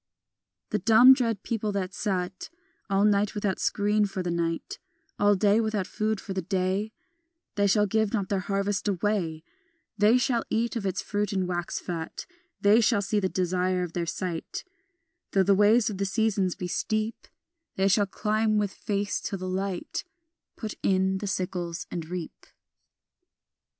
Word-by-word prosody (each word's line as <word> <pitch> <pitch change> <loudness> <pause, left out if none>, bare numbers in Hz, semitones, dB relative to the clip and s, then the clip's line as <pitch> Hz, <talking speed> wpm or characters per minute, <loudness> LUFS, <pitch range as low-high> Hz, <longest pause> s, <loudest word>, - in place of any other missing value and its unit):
The 210 - +1
dumb 230 +6 +8
dread 230 -6 -1
people 215 -2 -2
that 190 -1 -2
sat 190 -3 -3 0.4
All 195 +1 +3
night 205 0 +2
without 205 -2 -1
screen 210 +1 +2
for 190 -1 -4
the 175 - -2
night, 165 -1 -2 0.4
All 205 0 +5
day 205 +3 +3
without 215 -3 -1
food 215 +1 -1
for 195 - -6
the 190 - -2
day, 190 +3 -1 0.6
They 205 0 +2
shall 210 +1 +4
give 220 0 +1
not 200 -4 -1
their 195 0 0
harvest 200 +2 -1
away, 185 -5 -1 0.6
They 215 +4 +6
shall 240 -2 +1
eat 235 +2 0
of 210 -4 -2
its 190 0 -2
fruit 210 0 -1
and 190 -2 0
wax 175 -1 -3
fat: 165 -2 -5 0.3
They 210 +3 +5
shall 220 -2 +2
see 210 +1 +1
the 190 -2 0
desire 180 0 0
of 170 -2 -6
their 170 -1 -2
sight, 170 -1 -4 0.7
Though 195 - +4
the 200 +2 +4
ways 210 +4 +4
of 205 -4 -3
the 200 - +1
seasons 195 -2 +1
be 180 - -4
steep, 215 +5 -2 0.5
They 190 +1 +2
shall 200 +1 +3
climb 215 +2 0
with 205 -2 0
face 205 0 -2
to 195 - -3
the 185 0 -5
light, 190 0 -3 0.5
Put 220 -4 -5
in 190 0 +2
the 205 - -4
sickles 180 -3 -3
and 165 -2 -5
reap. 180 -2 -7
200 Hz, 165 wpm, -27 LUFS, 185-210 Hz, 0.7 s, dumb